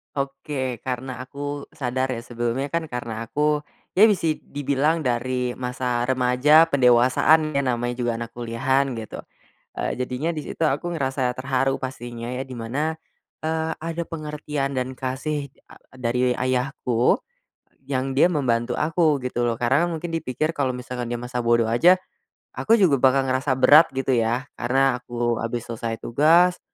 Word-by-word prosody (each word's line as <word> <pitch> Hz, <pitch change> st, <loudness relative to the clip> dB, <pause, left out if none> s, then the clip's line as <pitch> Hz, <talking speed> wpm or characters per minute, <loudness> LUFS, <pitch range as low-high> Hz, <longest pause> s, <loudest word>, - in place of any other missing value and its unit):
Oke, 135 Hz, -3 st, -3 dB
karena 130 Hz, -1 st, -5 dB
aku 145 Hz, +2 st, -6 dB
sadar 130 Hz, -2 st, -1 dB
ya 115 Hz, -, -7 dB
sebelumnya, 120 Hz, +3 st, -3 dB
kan, 165 Hz, -1 st, -1 dB
karena 115 Hz, -3 st, -5 dB
aku 150 Hz, +2 st, +1 dB, 0.3 s
ya 215 Hz, +4 st, +6 dB
bisa 165 Hz, -7 st, +1 dB
dibilang 145 Hz, +3 st, 0 dB
dari 125 Hz, 0 st, -1 dB
masa 125 Hz, -1 st, -2 dB
remaja 130 Hz, +5 st, +5 dB
pendewasaan 130 Hz, +4 st, +4 dB
ya 140 Hz, -, 0 dB
namanya 120 Hz, -2 st, -1 dB
juga 120 Hz, -1 st, 0 dB
anak 115 Hz, 0 st, -6 dB
kuliahan 120 Hz, +3 st, 0 dB
gitu, 110 Hz, -2 st, -7 dB, 0.6 s
eee, -, -, -1 dB
jadinya 130 Hz, +6 st, -2 dB
di 150 Hz, -, -4 dB
situ 165 Hz, -, -2 dB
aku 150 Hz, +5 st, -1 dB
ngerasa 130 Hz, -3 st, 0 dB
terharu 130 Hz, +1 st, 0 dB
pastinya 120 Hz, -3 st, -6 dB
ya 130 Hz, -, -3 dB
di 130 Hz, -2 st, -8 dB
mana, 150 Hz, +8 st, -2 dB, 0.5 s
eee, 160 Hz, 0 st, -1 dB
ada 165 Hz, +1 st, -4 dB
pengertian 150 Hz, -3 st, -4 dB
dan 130 Hz, 0 st, -3 dB
kasih 140 Hz, +3 st, -3 dB
e -, -, -20 dB, 0.2 s
dari 125 Hz, 0 st, 0 dB
ayahku, 125 Hz, -1 st, 0 dB, 0.7 s
yang 130 Hz, 0 st, -1 dB
dia 170 Hz, +6 st, +5 dB
membantu 120 Hz, -5 st, 0 dB
aku 155 Hz, -2 st, +2 dB
gitu 125 Hz, -1 st, -3 dB
loh 120 Hz, -1 st, 0 dB
karena 140 Hz, +8 st, +2 dB
mungkin 165 Hz, +1 st, -4 dB
dipikir 155 Hz, +2 st, -2 dB
kalo 135 Hz, -3 st, 0 dB
misalkan 125 Hz, -1 st, -5 dB
dia 120 Hz, -, -2 dB
masa 125 Hz, 0 st, -4 dB
bodo 115 Hz, -1 st, +3 dB
aja, 170 Hz, +12 st, +5 dB, 0.6 s
aku 225 Hz, 0 st, +3 dB
juga 170 Hz, -8 st, +5 dB
bakal 135 Hz, +1 st, +3 dB
ngerasa 130 Hz, +2 st, 0 dB
berat 155 Hz, +3 st, +7 dB
gitu 135 Hz, -1 st, 0 dB
ya, 120 Hz, +4 st, 0 dB
karena 130 Hz, +1 st, +1 dB
aku 120 Hz, -1 st, -1 dB
abis 115 Hz, +1 st, -3 dB
selesai 115 Hz, 0 st, -3 dB
tugas, 165 Hz, +8 st, +4 dB
130 Hz, 155 wpm, -23 LUFS, 120-150 Hz, 0.7 s, berat